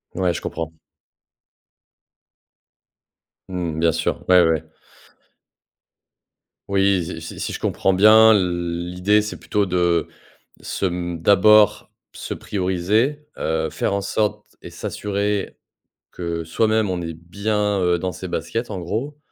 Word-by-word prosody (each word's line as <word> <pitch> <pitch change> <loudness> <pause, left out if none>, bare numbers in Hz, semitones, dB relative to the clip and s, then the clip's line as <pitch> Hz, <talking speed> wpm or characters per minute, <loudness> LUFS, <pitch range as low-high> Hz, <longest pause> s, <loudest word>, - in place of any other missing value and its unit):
Ouais, 90 -1 +1
je - - -5
comprends. 80 -1 -5 2.8
Mmh, 85 -4 -3
bien 85 0 +3
sûr, 85 +1 -2
ouais, 90 -1 +7
ouais. 80 -2 +1 2.1
Oui, 100 -2 +2
si 80 -1 -7
si 80 - -8
si - - -3
je - - -5
comprends 95 - 0
bien, 110 +3 +7
l'idée 90 +1 0
c'est 105 -4 -6
plutôt 100 +5 0
de 85 -2 +1 0.5
se, - - -2
mmh, 85 -1 -3
d'abord 105 +3 +5 0.2
se - - -7
prioriser, 105 +10 -1
heu, 80 0 -1
faire - - -2
en 100 - 0
sorte 100 +1 -1 0.2
et - - -9
s'assurer 100 0 -3 0.5
que 85 -1 -4
soi-même, 110 +5 +1
on 90 -1 -2
est 85 -1 -5
bien, 100 +4 -1
heu, 90 -1 +2
dans 90 +1 -3
ses 95 +2 -7
baskets 110 +9 -3
en 95 -3 -4
gros. 115 - -4
90 Hz, 125 wpm, -21 LUFS, 85-105 Hz, 2.8 s, ouais